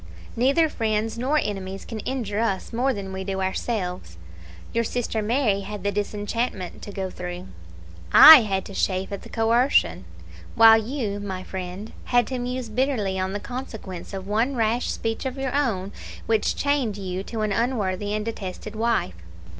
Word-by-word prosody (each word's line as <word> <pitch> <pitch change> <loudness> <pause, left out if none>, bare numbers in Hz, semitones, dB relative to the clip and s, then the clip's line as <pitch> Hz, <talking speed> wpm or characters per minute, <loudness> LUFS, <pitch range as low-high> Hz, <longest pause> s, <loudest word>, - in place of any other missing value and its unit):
neither 275 +7 +3
friends 220 -4 -1
nor 260 +6 0
enemies 195 -6 -3
can 225 - -6
injure 220 -4 -3
us 210 -3 -1
more 255 +4 +1
than 195 -5 -5
we 190 0 -4
do 190 0 -3
ourselves. 185 - -3 0.6
Your 230 - +1
sister 230 -1 -2
Mary 215 -2 +1
had 200 0 -7
the 205 - +1
disenchantment 205 -1 -3
to 205 - -8
go 190 -2 -4
through; 180 0 -7 0.6
I 315 0 +12
had 195 -3 -2
to 200 - -9
chafe 190 0 -1
at 200 - -5
the - - -12
coercion; 225 - +2 0.5
while 225 0 +8
you, 220 -4 -3
my 190 -2 -5
friend, 185 +3 -6
had 245 -1 +3
to 260 -1 -3
muse 250 0 -3
bitterly 215 -5 0
on 190 +1 -2
the 205 - -2
consequence 220 -7 -7
of 190 -2 -6
one 225 +7 0
rash 230 +1 0
speech 225 -1 -2
of 260 +1 -5
your 270 -1 -2
own, 210 -9 0 0.3
which 220 -2 +1
chained 280 -8 0
you 185 -2 -4
to 220 +2 -5
an 215 -1 0
unworthy 205 -3 -1
and 215 0 -2
detested 215 -1 -6
wife. 220 - 0
215 Hz, 170 wpm, -24 LUFS, 190-240 Hz, 0.6 s, I